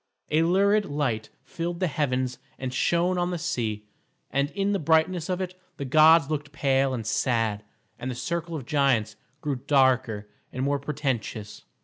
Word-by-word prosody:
A 155 Hz, +1 st, +4 dB
lurid 200 Hz, +5 st, +3 dB
light 135 Hz, -, -2 dB
filled 170 Hz, 0 st, -4 dB
the 185 Hz, -, +2 dB
heavens 130 Hz, -6 st, -1 dB, 0.2 s
and 130 Hz, -1 st, -4 dB
shone 175 Hz, +6 st, +2 dB
on 175 Hz, 0 st, 0 dB
the 180 Hz, -, -2 dB
sea, 110 Hz, -8 st, -2 dB, 0.5 s
and 140 Hz, +1 st, +1 dB
in 200 Hz, 0 st, 0 dB
the 200 Hz, -, +1 dB
brightness 160 Hz, +2 st, +2 dB
of 185 Hz, 0 st, -1 dB
it 185 Hz, -1 st, -3 dB, 0.2 s
the 140 Hz, -, -4 dB
gods 155 Hz, +2 st, +6 dB
looked 145 Hz, -1 st, -3 dB
pale 135 Hz, -2 st, +1 dB
and 115 Hz, -3 st, -5 dB
sad, 110 Hz, -1 st, 0 dB, 0.4 s
and 130 Hz, -, -4 dB
the 125 Hz, -, -4 dB
circle 170 Hz, +6 st, -3 dB
of 140 Hz, -6 st, -5 dB
giants 130 Hz, -7 st, +1 dB, 0.3 s
grew 145 Hz, -3 st, -1 dB
darker 130 Hz, -7 st, +3 dB, 0.2 s
and 130 Hz, -, -3 dB
more 140 Hz, +1 st, +1 dB
portentous. 135 Hz, -7 st, -4 dB
145 Hz, 165 wpm, -26 LUFS, 125-165 Hz, 0.5 s, gods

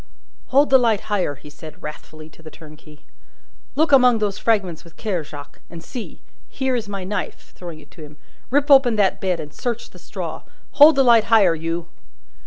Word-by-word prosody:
"Hold 280 Hz, +2 st, +3 dB
the 265 Hz, -, +7 dB
light 225 Hz, -4 st, +1 dB
higher!" 180 Hz, -8 st, -1 dB
he 145 Hz, +2 st, -15 dB
said, 160 Hz, +3 st, -13 dB
wrathfully, 155 Hz, +1 st, -10 dB
to 160 Hz, -, -20 dB
the 160 Hz, -, -11 dB
turnkey. 155 Hz, -1 st, -16 dB, 0.7 s
"Look 315 Hz, +2 st, +1 dB
among 250 Hz, -3 st, +5 dB
those 205 Hz, -2 st, -2 dB
fragments 195 Hz, -8 st, -1 dB
with 170 Hz, -, -18 dB
care, 190 Hz, -7 st, -3 dB
Jacques. 145 Hz, -1 st, -12 dB
And 165 Hz, -1 st, -11 dB
see! 235 Hz, +5 st, -9 dB, 0.3 s
Here 265 Hz, -1 st, -2 dB
is 225 Hz, -4 st, -4 dB
my 195 Hz, -2 st, -5 dB
knife," 190 Hz, 0 st, -6 dB
throwing 170 Hz, -3 st, -9 dB
it 145 Hz, -, -19 dB
to 165 Hz, -, -15 dB
him; 150 Hz, -1 st, -12 dB, 0.3 s
"rip 285 Hz, +2 st, +1 dB
open 265 Hz, -4 st, +6 dB
that 200 Hz, -3 st, +1 dB
bed, 185 Hz, -2 st, -1 dB
and 150 Hz, -1 st, -8 dB
search 235 Hz, -2 st, -5 dB
the -, -, -15 dB
straw. -, -, -7 dB, 0.3 s
Hold 300 Hz, +1 st, +7 dB
the 270 Hz, -, +4 dB
light 235 Hz, -3 st, +5 dB
higher, 210 Hz, -7 st, +4 dB
you!" 165 Hz, +1 st, -4 dB
195 Hz, 190 wpm, -21 LUFS, 160-240 Hz, 0.7 s, the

